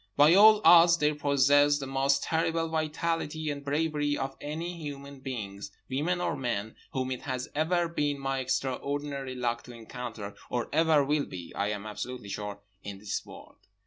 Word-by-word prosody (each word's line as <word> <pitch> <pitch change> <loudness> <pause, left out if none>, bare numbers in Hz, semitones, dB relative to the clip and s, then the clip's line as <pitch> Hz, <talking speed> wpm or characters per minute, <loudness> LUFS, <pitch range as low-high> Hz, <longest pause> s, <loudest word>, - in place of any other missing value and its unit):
By 150 +3 +7
all 215 +2 +8
odds 170 0 +8
they 150 -1 +2
possessed 145 0 +4
the 135 - -4
most 135 +1 +1
terrible 165 0 0
vitality 155 -1 -2
and 140 0 -6
bravery 145 0 0
of 135 0 -3
any 165 +4 -4
human 140 -2 -7
beings, 105 -7 -6 0.2
women 160 +7 0
or 175 - -1
men, 115 -5 -3 0.2
whom 130 -1 -2
it 130 - -3
has 130 -2 -4
ever 170 +3 +1
been 145 -3 -1
my 135 -1 -2
extraordinary 135 +1 -2
luck 120 -1 -1
to 120 - -10
encounter, 115 -2 -7 0.2
or 120 -1 -2
ever 160 -2 +4
will 145 0 0
be 90 -2 -8
(I 100 - -1
am 105 0 -4
absolutely 110 +1 -6
sure) 105 0 -5 0.2
in 100 0 -7
this 100 +1 -4
world. - - -13
140 Hz, 170 wpm, -29 LUFS, 125-155 Hz, 0.2 s, all